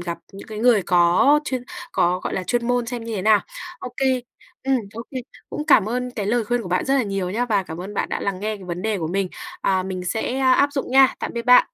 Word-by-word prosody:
gặp 170 -1 -4
những 195 - -10
cái 215 - -6
người 225 -3 +4
có 180 +13 +4
chuyên 255 -4 -2 0.3
có, 180 +1 +2
gọi - - -3
là, 185 - -1
chuyên 240 +2 0
môn 245 -1 +1
xem 235 -1 -5
như 230 -1 -4
thế 185 - -3
nào. 210 -1 +5 0.4
OK. 250 - -8 0.7
Ừm, 270 -1 +3 0.2
OK. 230 +2 -7 0.4
Cũng 300 - -4
cảm 220 -8 +5
ơn 250 +1 -2
cái 210 -5 -4
lời 235 +1 +1
khuyên 240 +2 0
của 180 - -7
bạn 180 - +1
rất 270 - +2
là 270 - +3
nhiều 195 -3 -2
nhá 230 +6 0
và 210 -5 +1
cảm 165 -1 -8
ơn 195 +3 -7
bạn - - -1
đã - - -3
lắng 195 -2 -2
nghe 215 0 -2
cái 195 - -12
vấn 175 +1 -5
đề 215 -3 0
của 160 - -2
mình, 190 +2 -1 0.3
à, 190 -1 +1
mình 185 -1 -5
sẽ 225 +7 -2
áp 270 +2 +4
dụng 275 -3 -3
nha. 265 0 +6
Tạm - - -3
biệt 235 - -2
bạn! 250 +1 +8
215 Hz, 260 wpm, -22 LUFS, 185-245 Hz, 0.7 s, bạn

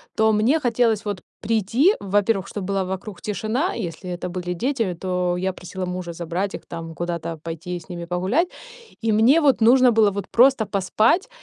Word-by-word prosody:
то 220 0 +3
мне 230 +9 +3
хотелось 235 -5 +1
вот 205 -3 -3 0.2
прийти, 230 - +2
во-первых, 200 0 +1
чтоб 205 -3 -5
была 195 -1 +1
вокруг 190 +1 -6
тишина. 220 - -1
Если 180 -3 -5
это 180 0 -4
были 180 0 -4
дети, 230 -3 -1
то 180 0 -1
я 190 +1 -1
просила 185 +1 -6
мужа 180 -1 -5
забрать 175 +4 -3
их - - -7
там, 165 -1 -7
куда-то 170 -1 -4
пойти 170 +2 -5
с 175 +1 -9
ними 170 -1 -6
погулять. 185 - 0 0.6
И 225 -1 +2
мне 235 +9 +5
вот 275 -5 +3
нужно 250 +2 +6
было 220 -2 +4
вот 200 -1 -4
просто 250 -1 +4
поспать, 215 - +1
195 Hz, 180 wpm, -22 LUFS, 180-230 Hz, 0.6 s, нужно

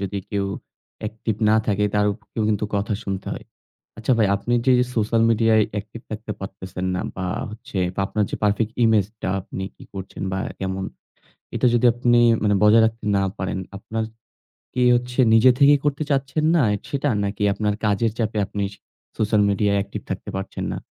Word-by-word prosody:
যদি 100 0 -3
কেউ 100 -1 0 0.6
একটিভ 110 0 -3
না 110 - +5
থাকে 105 -1 +1
তার 105 0 +3
উপরেও 110 +1 -6
কিন্তু 105 -1 0
কথা 100 +2 -1
শুনতে 95 -1 -4
হয়। - - -7 0.5
আচ্ছা 110 +4 0
ভাই 110 - +4
আপনি 120 +4 -2
যে 130 - +5 0.2
সোশ্যাল 115 0 +2
মিডিয়ায় 115 -1 +4 0.2
একটিভ 115 +3 -10
থাকতে 110 0 -5
পারতেছেন 95 -1 -6
না 90 - -1
বা 95 - -3 0.2
হচ্ছে 115 +2 -8 0.2
বা - - -4
আপনার 105 +1 0
যে - - -3
পারফেক্ট 105 +2 +1
ইমেজটা 110 -2 +1
আপনি 95 - -6
কি - - -14
করছেন 95 -1 -7
বা 95 - -1 0.2
কেমন? 95 0 -3 0.7
এটা - - +1
যদি 120 +1 +3
আপনি 120 0 +3 0.2
মানে 105 -1 +3
বজায় 110 +2 +7
রাখতে 115 -1 -3
না 95 - +2
পারেন 95 0 -2 0.2
আপনার 110 +3 -3 0.7
কি 125 - +1
হচ্ছে 125 +1 -5 0.2
নিজে 115 +3 +7
থেকেই 145 +1 +6
করতে 145 0 0
চাচ্ছেন 140 +2 0
না 150 - +4 0.3
সেটা? 145 0 -1 0.2
নাকি 100 +1 -3
আপনার 105 0 0
কাজের 105 +1 +1
চাপে 110 -1 -1
আপনি 100 +1 -4 0.6
সোশ্যাল 110 0 +2
মিডিয়ায় 100 0 +2
একটিভ 100 - -7
থাকতে - - -4
পারছেন 95 - -5
না? - - -4
110 Hz, 175 wpm, -22 LUFS, 100-115 Hz, 0.7 s, বজায়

